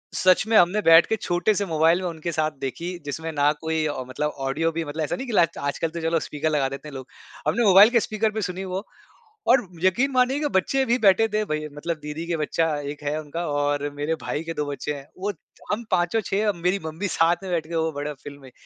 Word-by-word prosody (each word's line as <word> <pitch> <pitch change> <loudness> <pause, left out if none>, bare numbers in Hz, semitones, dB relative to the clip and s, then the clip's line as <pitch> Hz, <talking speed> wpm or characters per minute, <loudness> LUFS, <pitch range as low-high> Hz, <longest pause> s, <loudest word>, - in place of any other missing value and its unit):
सच 185 +2 +4
में 225 - +1
हमने 180 +5 +4
बैठ 165 -2 +7
के 220 - 0
छोटे 175 0 0
से 200 - 0
मोबाइल 165 +1 +3
में 185 - -2
उनके 165 +1 -5
साथ 155 -1 0
देखी, 170 +7 -4
जिसमें 160 +3 -4
ना 145 -1 +3
कोई 160 -1 0 0.2
मतलब 140 +4 -2 0.2
ऑडियो 155 +5 0
भी 165 +1 -3
मतलब 155 +2 -3
ऐसा 155 - -2
नहीं 265 - -6
कि 240 - -4
ल 175 -4 +6
आजकल 140 +3 -2
तो 170 +1 -6
चलो 165 0 +1
स्पीकर 150 +1 -2
लगा 145 -3 +1
देते 140 +2 -8
हैं 150 - -9
लोग। 130 -1 -7 0.4
हमने 235 - +2
मोबाइल 200 +2 +8
के 240 -1 +3
स्पीकर 215 0 -1
पे 220 +1 -3
सुनी 185 0 -3
वो 190 +2 -4 0.6
और 245 -3 +4 0.2
यकीन 240 +9 +3
मानिए 255 +2 +2
की 300 - 0
बच्चे 265 +5 +1
भी 240 +1 +2
बैठे 210 0 +5
थे 215 0 0
भाई 155 -3 -3
मतलब 165 +3 -3
दीदी 150 +3 -5
के 170 - -1
बच्चा 160 +1 0 0.2
1 150 0 -9
है 145 +2 -1
उनका 160 +3 -5
और 145 -1 0
मेरे 145 +3 -1
भाई 150 - -3
के 165 - -4
2 150 - -1
बच्चे 145 +1 -3
हैं। 140 -1 -10
वो 200 +3 -2 0.4
हम 225 +3 -2
पाँचो 175 +4 +2
6 210 0 0
मेरी 180 +3 +2
मम्मी 160 +6 -3
साथ 170 0 +3
में 190 - -6
बैठ 165 -3 -1
के 170 - -7
वो 160 0 +1
बड़ा 145 +1 -4
फ़िल्म 145 0 -10
में 130 - -13
165 Hz, 240 wpm, -24 LUFS, 150-195 Hz, 0.6 s, मोबाइल